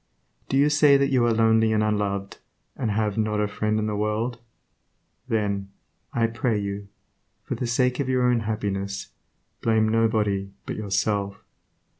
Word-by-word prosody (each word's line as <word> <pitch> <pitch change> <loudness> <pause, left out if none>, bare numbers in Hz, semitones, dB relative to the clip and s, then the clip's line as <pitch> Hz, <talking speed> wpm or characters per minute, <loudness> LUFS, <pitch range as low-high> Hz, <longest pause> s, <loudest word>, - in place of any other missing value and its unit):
Do 135 - +1
you 145 +2 +4
say 145 -2 +6
that 140 0 +1
you 130 -3 +3
are - - +3
lonely 110 0 +3
and 110 0 +2
unloved, 100 -2 -1 0.4
and 120 - -2
have 105 0 0
"not 105 -1 0
a 105 - +1
friend 105 +1 -1
in 110 - 0
the 105 -1 -2
world"? 110 +3 -1 0.9
Then, 100 -3 -1 0.4
I 115 - +1
pray 115 0 0
you, 100 0 -4 0.6
for - - -4
the 125 - -3
sake 125 +2 +1
of 135 -2 -1
your 130 -1 +2
own 125 -1 +3
happiness, 100 -3 -3 0.5
blame 110 -1 +2
nobody 110 -3 +1 0.2
but - - -4
yourself. 100 -1 -1
110 Hz, 160 wpm, -25 LUFS, 105-115 Hz, 0.9 s, say